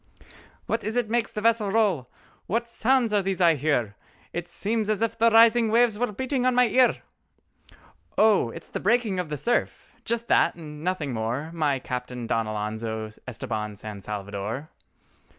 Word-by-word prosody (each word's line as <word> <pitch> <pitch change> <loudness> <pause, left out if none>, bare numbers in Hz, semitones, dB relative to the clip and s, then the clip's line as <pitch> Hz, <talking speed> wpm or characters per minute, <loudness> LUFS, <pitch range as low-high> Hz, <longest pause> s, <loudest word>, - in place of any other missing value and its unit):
"What - - -2
is 220 +2 -2
it 240 -3 0
makes 235 -1 +1
the 210 - -4
vessel 225 -2 +2
roll? 195 - +1 0.4
What 230 +4 -1
sounds 235 -1 +1
are 205 - +3
these 190 -1 -2
I 170 -2 +5
hear? 130 -8 0 0.4
It 175 0 -4
seems 215 +2 -1
as 215 0 +1
if 230 0 -1
the 230 0 +4
rising 230 0 +6
waves 230 -1 +3
were 245 -2 0
beating 260 +4 -2
on 255 -1 +2
my 250 0 +5
ear!" 255 +3 +3 1.1
"Oh 210 - +4
it - - -9
is - - -15
the - - -3
breaking 215 -3 +1
of 180 -4 -3
the 150 - -3
surf—just 235 - -2
that - - +3
and 150 -2 -10
nothing 165 -7 -2
more, 120 +8 -3
My 150 -5 0
Captain 125 -1 -5
Don 115 -1 0
Alonzo 110 +1 -4 0.2
Estabán 110 -3 -4
San 105 -1 -8
Salvador!" 105 +7 -5
185 Hz, 170 wpm, -25 LUFS, -, 1.1 s, rising